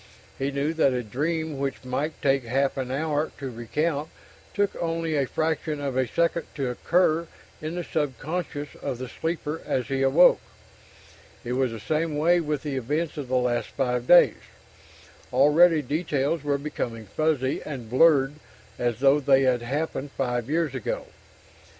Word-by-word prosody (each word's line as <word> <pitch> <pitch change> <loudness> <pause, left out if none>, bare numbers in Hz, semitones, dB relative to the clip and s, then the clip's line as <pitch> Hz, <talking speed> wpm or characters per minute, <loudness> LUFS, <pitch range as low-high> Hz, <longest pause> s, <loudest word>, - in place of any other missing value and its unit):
He 135 +1 0
knew 140 +3 -1
that 150 -5 +3
a 125 -1 -1
dream 155 +6 -2
which 135 -1 -3
might 145 +5 -2
take 135 -1 +3
half 135 +4 0
an 130 -2 -3
hour 150 +3 -1
to 135 -2 -5
recount 145 +6 -2 0.5
took 200 -1 +1
only 165 -1 -1
a 140 -2 +1
fraction 155 0 -1
of 140 -2 -3
a 130 -1 +1
second 170 +4 0
to 135 -4 -1
occur 170 +4 +2 0.3
in 155 +2 -4
the 175 - -3
sub 145 -6 -2
conscious 150 -1 -4
of 135 -4 -3
the 130 +1 -6
sleeper 160 +2 -3
as 125 0 -2
he 135 -1 0
awoke. 135 +7 +5 1.0
It 120 - -2
was 130 0 +1
the 115 - -6
same 155 +5 -1
way 170 +4 +4
with 150 -4 -2
the 145 -3 -3
events 150 +6 -2
of 145 -3 -4
the 130 - -1
last 125 -1 +1
five 125 -2 -2
days; 175 - +6 0.9
already 150 +5 +5
details 145 +1 -1
were 145 -1 +1
becoming 120 -6 -4
fuzzy 140 +3 0
and 130 -6 -6
blurred 135 +2 +4 0.5
as 120 -1 -1
though 140 +1 +5
they 135 -1 +4
had 125 -2 +2
happened 145 +3 -3
five 125 -2 -2
years 160 -2 0
ago. 130 -5 -3
140 Hz, 165 wpm, -26 LUFS, 130-160 Hz, 1.0 s, days